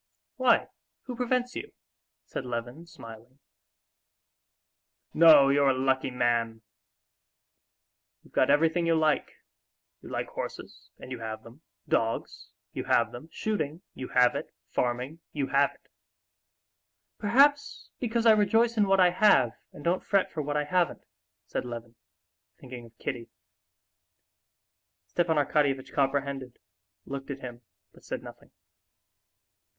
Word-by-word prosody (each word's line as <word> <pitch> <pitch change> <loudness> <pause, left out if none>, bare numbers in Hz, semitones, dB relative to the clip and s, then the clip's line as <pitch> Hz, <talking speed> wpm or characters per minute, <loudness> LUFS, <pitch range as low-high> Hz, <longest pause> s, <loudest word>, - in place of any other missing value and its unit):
"Why, 255 -3 +3 0.4
who 250 - -6
prevents 250 0 -1
you?" 430 - -7 0.5
said - - -5
Levin, 125 +6 -6
smiling. 115 -3 -13 1.8
"No, 155 -4 +7
you're 140 0 +4
a 130 - +1
lucky 130 0 +1
man! 120 -2 0 1.6
You've - - -22
got - - +3
everything 165 +3 +3
you 165 - +3
like. 155 -1 +1 0.7
You - - -11
like - - -3
horses—and - - -9
you 125 - -5
have 110 -1 -6
them; 120 +6 -15 0.3
dogs—you 115 0 -3
have 115 -1 +2
them; 125 +7 -10
shooting—you 160 -9 -4
have 125 -1 +4
it; - - -5 0.2
farming—you 135 +4 -3
have 140 0 +3
it." - - -29 1.3
"Perhaps 285 +6 +2
because 235 -1 -1
I 225 - +8
rejoice 225 +2 +3
in 205 -2 +3
what 195 0 +3
I 180 -1 +6
have, 175 - +4 0.2
and 145 - -12
don't 175 +2 0
fret 195 -2 +1
for 155 - -3
what 145 0 -2
I 150 - +1
haven't," 175 +3 0 0.4
said - - -3
Levin, 120 -1 -8 0.7
thinking 125 -2 -10
of 115 - -24
Kitty. 120 -4 -5 1.8
Stepan 165 -2 0
Arkadyevitch 140 -2 +1
comprehended, 135 -2 -1 0.5
looked 135 0 -7
at 140 -1 -6
him, 120 -1 -8 0.3
but - - -20
said - - -5
nothing. - - -13
140 Hz, 125 wpm, -28 LUFS, 125-180 Hz, 1.8 s, I